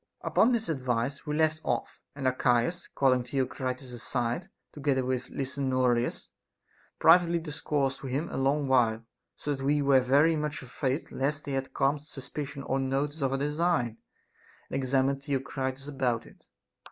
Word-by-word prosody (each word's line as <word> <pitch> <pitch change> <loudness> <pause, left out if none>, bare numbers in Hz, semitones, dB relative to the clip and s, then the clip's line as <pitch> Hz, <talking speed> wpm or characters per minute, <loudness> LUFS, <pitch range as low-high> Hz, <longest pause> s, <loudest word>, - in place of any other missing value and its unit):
Upon 235 - +3
this 230 -2 0
advice 130 -1 -1
we 150 - -1
left 155 0 +2
off; - - -2
and 140 -2 -5
Archias, 125 +6 +1
calling 130 -2 +3
Theocritus 130 0 -3
aside 120 +7 -2 0.2
together 140 -3 0
with 130 0 -2
Lysanoridas, 130 -3 0 0.7
privately 170 +1 +6
discoursed 150 -4 -2
him 135 +4 -2
a - - -3
long 140 +2 +1
while, 115 -4 +3 0.3
so 145 - -2
that 135 -1 -5
we 145 +1 +2
were 140 -1 +6
very 145 +6 +4
much 150 -2 -3
afraid 130 +3 -2
lest 145 +2 -1
they 140 - -4
had 135 -1 -2
some 140 +2 +2
suspicion 140 -1 -7
or 135 0 0
notice 140 +3 -1
of 135 -1 +1
our 135 - +1
design, 150 -5 0 0.7
and - - -2
examined 135 +1 +1
Theocritus 135 -1 -3
about 130 -5 -1
it. - - -18
135 Hz, 150 wpm, -29 LUFS, 130-150 Hz, 0.7 s, privately